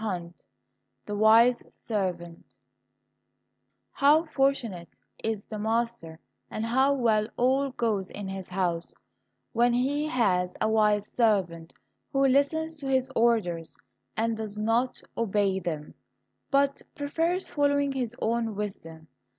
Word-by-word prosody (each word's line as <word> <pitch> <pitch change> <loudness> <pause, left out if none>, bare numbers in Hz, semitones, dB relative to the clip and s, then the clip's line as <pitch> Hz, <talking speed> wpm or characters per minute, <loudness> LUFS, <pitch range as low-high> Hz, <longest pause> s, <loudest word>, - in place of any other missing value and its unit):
162 175 -5 -5 0.6
The 210 - -4
Wise 225 +3 +5
Servant 180 -6 -4 1.5
How 300 +4 +4
fortunate 270 - -1 0.3
is 220 -2 -2
the 215 - -7
master, 225 -7 -2 0.3
and 220 - -3
how 265 +4 +3
well 220 -5 +2
all 265 +3 +2
goes 220 -7 -1
in 205 -1 -7
his 190 -1 -6
house, 180 -2 -2 0.6
when 240 +1 +3
he 280 +5 0
has 185 -10 +1
a 215 - +1
wise 210 -2 +3
servant 190 -9 0 0.4
who 275 0 +2
listens 315 +4 +1
to 275 - -6
his 265 0 +1
orders 205 -9 +1 0.4
and 225 +1 +1
does 215 -2 -6
not 225 +4 0 0.2
obey 200 -3 +1
them, 155 -4 -5 0.6
but 280 0 +2
prefers 330 +5 -1
following 285 -1 +1
his 245 -3 -3
own 225 -1 -1
wisdom. 165 -6 -6
225 Hz, 120 wpm, -27 LUFS, 195-265 Hz, 1.5 s, Wise